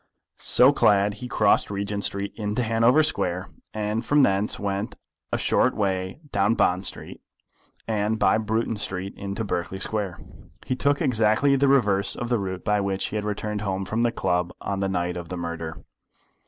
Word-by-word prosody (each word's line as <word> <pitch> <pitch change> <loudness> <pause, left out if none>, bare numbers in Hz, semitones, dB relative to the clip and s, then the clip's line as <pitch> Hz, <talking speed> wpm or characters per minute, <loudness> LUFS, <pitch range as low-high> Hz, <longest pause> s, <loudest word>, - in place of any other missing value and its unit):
So 130 +3 +6
clad 100 -5 +3
he 125 - -4
crossed - - +2
Regent 100 0 -3
Street 100 0 -2
into 105 +2 -2
Hanover 115 +6 +4
Square, 90 - -2 0.2
and 105 +1 -2
from 145 -1 +4
thence 100 -2 +1
went 100 +1 -3 0.4
a - - +1
short - - +2
way 95 +3 -2
down 100 +3 +2
Bond 95 -3 +1
Street, - - -9 0.7
and 110 0 0
by 110 - +3
Bruton 110 +1 -1
Street 95 -2 -3
into 100 +2 -4
Berkeley 95 -2 -3
Square. 100 -2 -3 0.5
He 130 - -1
took 140 +2 +1
exactly 115 +3 +3
the 140 +1 +3
reverse 105 -8 +3
of 120 - -4
the 120 -2 +1
route 95 -2 -5
by 105 -1 +2
which 100 -1 -1
he - - -6
had 105 -1 -2
returned 105 0 -3
home 95 -2 -2
from 110 +4 -1
the 120 0 +2
club 90 -4 -1
on 100 -1 -3
the 95 0 0
night 90 -1 -1
of 85 -1 -7
the 90 - -4
murder. 85 -1 -5
105 Hz, 180 wpm, -25 LUFS, 95-110 Hz, 0.7 s, So